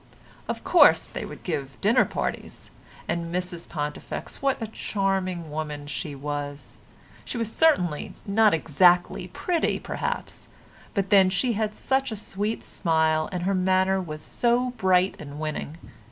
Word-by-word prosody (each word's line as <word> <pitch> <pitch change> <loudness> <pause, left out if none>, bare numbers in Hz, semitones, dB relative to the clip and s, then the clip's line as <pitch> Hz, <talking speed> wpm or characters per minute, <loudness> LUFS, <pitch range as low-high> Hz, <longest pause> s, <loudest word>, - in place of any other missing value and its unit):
Of - - -3
course - - +6
they - - -5
would - - -10
give 135 -1 -4
dinner 230 +5 +4
parties. - - -5 0.4
And 170 0 -2
Mrs 180 -1 -3
Pontifex, 150 -2 -5
what 275 -1 +1
a 225 - -3
charming 190 -6 -2
woman 150 -1 -4
she 145 +1 -5
was; 145 0 -5 0.5
she - - -5
was 230 -1 -2
certainly 180 - +2
not 215 +1 +4
exactly 175 +3 +3
pretty 335 - 0
perhaps, - - -4 0.5
but 195 0 -1
then 195 -2 +7
she 200 +6 0
had 215 0 -1
such 265 -1 0
a - - -3
sweet 205 +1 -3
smile 160 -2 +1
and 180 -2 -3
her 195 +2 +1
manner 190 +1 +2
was 155 -3 -7
so 245 +1 +1
bright 185 -5 +2
and 145 0 -8
winning. 155 0 -4
185 Hz, 145 wpm, -26 LUFS, 155-210 Hz, 0.5 s, then